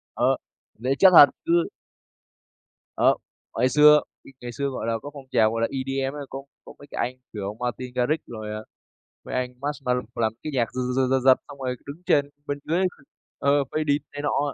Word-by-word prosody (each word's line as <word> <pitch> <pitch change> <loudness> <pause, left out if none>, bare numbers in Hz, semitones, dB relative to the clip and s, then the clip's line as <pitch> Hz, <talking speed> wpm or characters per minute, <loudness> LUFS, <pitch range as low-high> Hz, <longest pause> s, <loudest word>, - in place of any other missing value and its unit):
Ờ, - - +3 0.4
mình - - -16
thấy 135 - +3
chất 190 +5 +7
thật, 145 -3 +11 0.2
cứ 170 0 +3 1.3
Đó, - - +5 0.4
hồi 130 - +2
xưa 150 +2 +7 0.2
bị - - -14
ngày 120 0 -6
xưa, 140 +3 -2
gọi 130 -4 -4
là, 115 - +1
có 145 - -6
phong 140 -2 -10
trào, 110 -1 +4
gọi 115 0 -2
là, 115 - +2
EDM 135 0 -2 0.2
có 135 0 -7 0.2
có - - -11
mấy 145 - -13
cái - - -6
anh, 130 - -16 0.2
kiểu, 105 0 -5
Martin 125 +1 -4
Garrix 125 +6 +1
rồi, 110 -2 -6
à, 105 - -4 0.6
mấy - - -6
anh 125 0 -2
Marshmello 135 -4 -1
làm 110 -2 0
cái 155 - -4
nhạc 120 -4 0
giật, 130 - -2
giật, 130 0 +2
giật, 135 0 +3
giật, 130 0 +5
xong 140 - -10
rồi 130 -1 -2
đứng 150 +5 -9
trên 145 -4 +3 0.2
bên 145 0 -3
dưới 170 +4 +1 0.6
ờ, 140 0 +3
"Faded" 150 -2 +1
này 145 - -5
nọ. 145 -1 0
135 Hz, 205 wpm, -25 LUFS, 125-145 Hz, 1.3 s, thật